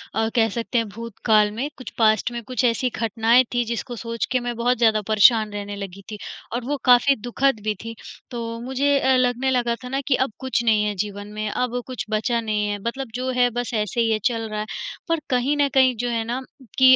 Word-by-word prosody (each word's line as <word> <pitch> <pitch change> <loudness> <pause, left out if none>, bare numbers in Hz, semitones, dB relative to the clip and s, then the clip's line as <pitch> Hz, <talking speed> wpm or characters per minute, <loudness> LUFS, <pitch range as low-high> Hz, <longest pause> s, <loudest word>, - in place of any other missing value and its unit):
अ, 225 0 +1
कह 225 -2 +4
सकते 230 +2 -2
हैं 230 -2 +1
भूतकाल 215 -1 +1
में, 255 +7 -3
कुछ 255 - -8
पास्ट 220 0 +3
में 240 0 -4
कुछ 255 +3 -2
ऐसी 245 +2 +2
घटनाएँ 230 +2 +3
थी 240 - +2
जिसको 235 +1 -4
सोच 230 0 -3
के 255 - +2
मैं 240 -1 -4
बहुत 245 +2 +1
ज़्यादा 220 -2 +3
परेशान 215 0 +5
रहने 205 0 -5
लगी 200 -1 -7
थी 210 - -5 0.4
और 240 - -2
वो 290 +3 -1
काफ़ी 250 +2 +6
दु:खद 245 +1 0
भी 215 0 0
थी। 230 0 -6 0.4
तो 230 -1 -4
मुझे 270 +3 +1
अ, 265 -1 +3
लगने 250 +1 +1
लगा 240 -2 +1
था 250 - -6
ना 270 +2 -1
कि 275 - +4
अब 260 -1 0
कुछ 260 -2 -1
नहीं 215 -2 +3
है 210 -1 -1
जीवन 205 0 -8
में, 215 0 -3
अब 245 +2 -1
कुछ 255 -5 -5
बचा 225 +2 0
नहीं 210 -2 -1
है। 205 - -2
मतलब 260 0 -4
जो 255 +1 -2
है 245 0 +5
बस 245 0 -4
ऐसे 215 +1 0
ही 225 -1 +2
है, 215 - +1
चल 230 -3 0
रहा 215 0 -3
है, 210 - -2 0.4
पर 330 -1 +2
कहीं 260 +3 +1
न 285 -1 +3
कहीं 260 -2 +5
जो 245 0 -1
है 230 -1 0
ना 245 +3 -3 0.4
कि 260 0 +8
235 Hz, 235 wpm, -23 LUFS, 220-255 Hz, 0.4 s, कि